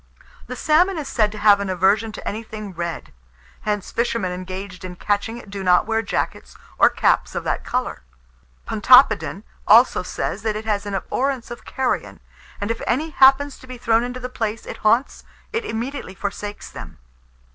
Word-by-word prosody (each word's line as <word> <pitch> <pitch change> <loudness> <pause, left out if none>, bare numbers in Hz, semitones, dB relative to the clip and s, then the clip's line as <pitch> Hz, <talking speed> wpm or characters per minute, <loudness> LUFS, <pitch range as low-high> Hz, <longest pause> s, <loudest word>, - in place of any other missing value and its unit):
The - - -5
salmon 345 +4 +3
is 300 -3 -4
said 215 -6 +1
to 215 - -8
have 205 -1 +5
an 200 -1 -3
aversion 195 +5 +2
to - - -8
anything 215 -2 -6
red; 170 -1 -5 0.5
hence, 210 -2 -2
fishermen 230 -5 -1
engaged 185 +1 -7
in 180 -1 -7
catching 205 +5 -1
it 210 -4 -12
do 200 -1 -5
not 180 -1 +4
wear 225 0 0
jackets 215 - -3 0.2
or - - +7
caps - - +1
of - - -2
that - - -2
colour. - - -2 0.7
Pontoppidan - - +5 0.2
also - - +6
says, 200 - -4
that 215 0 -1
it 215 +1 -5
has 205 -2 -1
an 200 - -3
abhorrence 255 +4 -2
of 240 - -9
carrion, 260 -1 -2 0.4
and 205 +2 -2
if 230 - -4
any 305 +6 0
happens 275 0 +4
to 260 - -14
be 255 -1 -8
thrown 230 -1 +2
into 245 +1 -5
the 250 - -4
places 225 -3 -4
it - - -7
haunts, 230 +5 +1 0.3
it 455 0 -1
immediately 235 - -4
forsakes 205 +1 -5
them. - - -10
220 Hz, 180 wpm, -22 LUFS, 200-250 Hz, 0.7 s, or